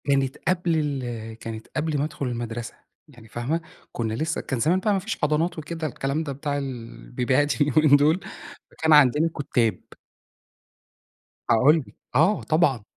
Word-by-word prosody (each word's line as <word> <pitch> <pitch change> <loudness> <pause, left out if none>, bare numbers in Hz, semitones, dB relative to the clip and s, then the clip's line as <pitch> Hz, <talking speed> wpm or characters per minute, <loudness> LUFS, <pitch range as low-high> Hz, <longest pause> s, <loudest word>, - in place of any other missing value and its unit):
كانت 135 0 +1
قبل 175 -2 +1
ال 120 -7 -3
كانت 110 -1 -7
قبل 155 -1 0
ما 140 - 0
أدخُل 150 -2 -4
المدرسة، 120 -1 -4 0.3
يعني 120 -6 -16
فاهمة؟ 125 +9 -2 0.3
كُنّا 110 -2 -2
لسّه 155 +8 -2
كان 135 -4 -3
زمان 165 +9 +3
بقى 205 +2 +1
ما 195 - +1
فيش 215 +5 -4
حضانات 155 +4 +1
وكده 160 +1 -4
الكلام 140 +3 -2
ده 145 - -4
بتاع 145 +1 -3
ال 140 - -2 0.3
البيبيهات 130 +5 0
اليومين 145 0 +5
دول، 150 +5 +4 0.5
فكان 160 -1 +2
عندنا 150 +2 +5
كُتّاب. 120 -5 0 1.7
هاقول 135 +8 +5
لِك. - - -17 0.2
آه 165 +10 +4
طبعًا. 155 -8 +2
145 Hz, 155 wpm, -24 LUFS, 125-160 Hz, 1.7 s, اليومين